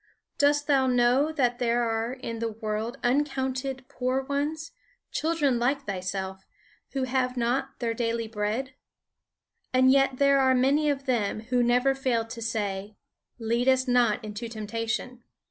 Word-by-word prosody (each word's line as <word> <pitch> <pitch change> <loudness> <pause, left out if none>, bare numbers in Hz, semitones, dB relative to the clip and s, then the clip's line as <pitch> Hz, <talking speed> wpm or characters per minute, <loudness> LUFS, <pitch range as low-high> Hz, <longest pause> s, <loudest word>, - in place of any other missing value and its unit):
Dost 290 0 +3
thou 275 -3 +3
know 250 +4 +3
that 245 -6 0
there 240 0 +1
are 225 +1 -1
in 230 -3 -6
the 230 0 -2
world 220 +3 -4
uncounted 265 0 -1
poor 255 +1 -1
ones, 295 +4 -3 0.4
children 300 -6 +1
like 275 +3 0
thyself, 190 0 -4 0.5
who 270 -1 -1
have 255 0 0
not 260 +3 -1
their 230 -2 -1
daily 230 -1 -1
bread? 220 +5 -2 1.0
And 260 0 +5
yet 270 -1 +3
there 280 0 +4
are 260 -1 +4
many 280 +4 +3
of 275 -1 -2
them 220 -5 0
who 245 +2 0
never 245 +3 +3
fail 255 -4 0
to 230 +1 -8
say: 205 -3 -3 0.4
'Lead 235 +2 0
us 260 0 +3
not 240 -3 +2
into 215 +2 -6
temptation.' 230 +3 -4
250 Hz, 145 wpm, -27 LUFS, 230-270 Hz, 1.0 s, And